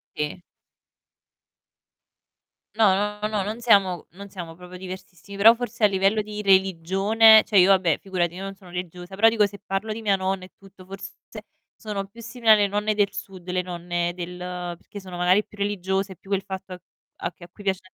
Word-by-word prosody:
Sì. 150 +4 -4 2.3
No, 210 -4 +5 0.3
no, 210 - 0
no, 210 -3 -1
non 220 +4 -5
siamo 195 -6 +3
non 200 +2 -10
siamo 175 -4 -8
proprio 180 +1 -11
diversissimi, 190 +1 -9
però 225 +3 +8
forse 235 -1 -5
a - - +9
livello 195 +2 +1
di 210 0 -6
religione, 195 +3 +5
cioè 205 -3 +4
io 180 - +6
vabbè 185 -5 +3
figurati, 175 -3 -2
io 185 - -8
non 195 0 -6
sono 185 -2 -16
religiosa, 180 +1 -7
però 215 +4 +5
dico 220 -2 +3
se 200 -1 -7
parlo 205 +3 -3
di 225 - -7
mia 205 -3 +2
nonna 190 0 -2
e 185 - -17
tutto, 195 -1 -16
forse 195 +1 -9 0.6
sono 200 -2 -5
più 215 +4 -17
simili 230 0 -3
alle 210 -1 +6
nonne 210 +1 -1
del 205 -1 +1
Sud, 195 -4 -9
le 180 0 0
nonne 175 -1 -3
del 180 0 -6 0.4
perché 205 +4 -11
sono 185 -2 -9
magari 180 +4 +3
più 210 - -17
religiose, 195 -1 -1
più 195 +4 -16
quel 195 - +1
fatto 190 -1 -7
a 180 - -9 0.4
a 175 - -4
che 175 - -17
a - - -10
cui 190 +4 -15
piace 190 -2 0
195 Hz, 195 wpm, -24 LUFS, 180-210 Hz, 2.3 s, a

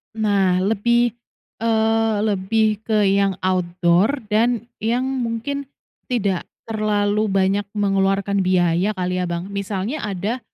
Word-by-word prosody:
Nah 195 -4 +2
lebih, 235 +3 +2 0.5
eee, 225 -1 +2
lebih 215 +1 +1
ke 215 -1 +2
yang 195 -1 +2
outdoor 185 +6 +1
dan 230 +1 +2 0.2
yang 235 +4 0
mungkin 260 +2 -3 0.4
tidak 200 -7 -1 0.2
terlalu 210 -1 0
banyak 195 +1 +1
mengeluarkan 195 0 +1
biaya 185 +2 +2
kali 180 0 -2
ya, 180 - 0
Bang. 175 +3 -4
Misalnya 200 +7 -3
ada, 205 +5 -2
205 Hz, 115 wpm, -21 LUFS, 190-225 Hz, 0.5 s, Nah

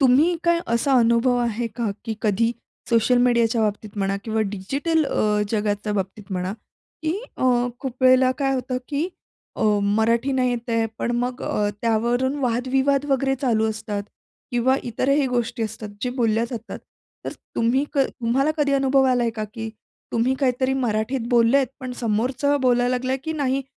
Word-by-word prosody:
तुम्ही 285 +7 +4
काय 340 0 +3
असा 270 +4 +1
अनुभव 235 +2 +3
आहे 235 0 -1
का 230 -4 -1
की 225 -2 -3
कधी 225 +2 +2 0.4
सोशल 230 +2 +4
मीडियाच्या 235 -2 +3
बाबतीत 210 0 -2
म्हणा 195 0 0
किंवा 220 -1 -1
डिजिटल 285 - 0
अ, 210 0 +1
जगाच्या 210 -1 -1
बाबतीत 195 +1 -3
म्हणा, 180 +1 -2 0.5
की 315 0 0 0.2
अ, - - -1 0.4
खूप 260 -1 -6
वेळेला 255 0 +6
काय 270 -1 +1
होतं 255 0 -2
की 300 +4 -1 0.5
अ, - - -2 0.2
मराठी 225 +6 +2
नाही 255 -1 +2
येत 240 -1 -4
आहे, 230 0 +2
पण - - -1
मग 245 +1 -2
अ, 205 0 0
त्यावरून 240 +4 +1
वादविवाद 265 +3 +1
वगैरे 270 0 +1
चालू 220 -3 +2
असतात 210 -1 -4 0.5
किंवा 250 +2 +2
इतरही 265 +4 +1
गोष्टी 240 -2 -1
असतात 220 0 -5
जे 250 - 0
बोलल्या 225 0 +2
जातात. 230 -2 -6 0.5
तर - - -4 0.2
तुम्ही 245 +5 +2
क 280 - 0
तुम्हाला 250 +5 0
कधी 285 -2 +1
अनुभव 270 0 +3
आलाय 240 -2 +2
का 215 - -3
की 225 -1 -4 0.4
तुम्ही 240 +3 +2
काहीतरी 260 0 +1
मराठीत 240 0 -1
बोललेत, 245 +3 +4
पण 255 -1 -5
समोरचं 255 +6 0
बोलायला 245 -1 +3
लागला 255 +1 -1
की 320 - -2
नाही 275 -3 0
245 Hz, 160 wpm, -23 LUFS, 225-265 Hz, 0.5 s, वेळेला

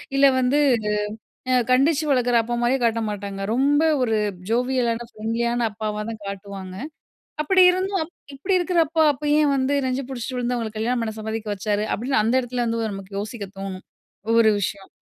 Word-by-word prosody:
இல்ல 275 0 +6
வந்து 260 +3 +2 0.9
அ - - +5
கண்டிச்சு 280 +5 +3
வளர்க்கிற 245 -3 +3
அப்பா 240 +2 -3
மாரியே 245 +3 +2
காட்ட 230 0 +2
மாட்டாங்க. 200 -1 -5
ரொம்ப 280 +5 +3 0.2
ஒரு 225 -3 +1 0.3
ஜோவியலான, 240 -1 0
ஃப்ரெண்ட்லியான 235 +2 -1
அப்பாவா 210 0 -4
தான் 220 -2 -8
காட்டுவாங்க. 195 -1 -7 0.7
அப்பிடி 375 +4 +5
இருந்தும், 375 -1 -1 0.3
இப்பிடி 370 +7 +1
இருக்கிற 350 0 +1
அப்பா, 320 +1 +2
அப்ப 295 +2 -5
ஏன் 295 -2 +3
வந்து 270 +1 +1
நெஞ்சு 260 +1 -2
பிடிச்சிட்டு 250 0 -4
விழுந்து 245 0 -1
அவுங்களுக்கு 220 -2 -4
கல்யாணம் 235 +2 0
பண்ண 220 -1 -3
சம்மதிக்க 220 -1 -3
வச்சாரு? 210 +1 -1
அப்பிடீன்னு 245 +1 +1
அந்த 225 +3 +1
இடத்துல 245 0 -2
வந்து 230 -1 -1
நமக்கு 195 0 -7
யோசிக்க 210 0 -5
தோணும். 195 -1 -6 0.4
ஒவ்வொரு 230 -1 +5
விஷயம். 195 0 -4
235 Hz, 165 wpm, -23 LUFS, 215-265 Hz, 0.9 s, இல்ல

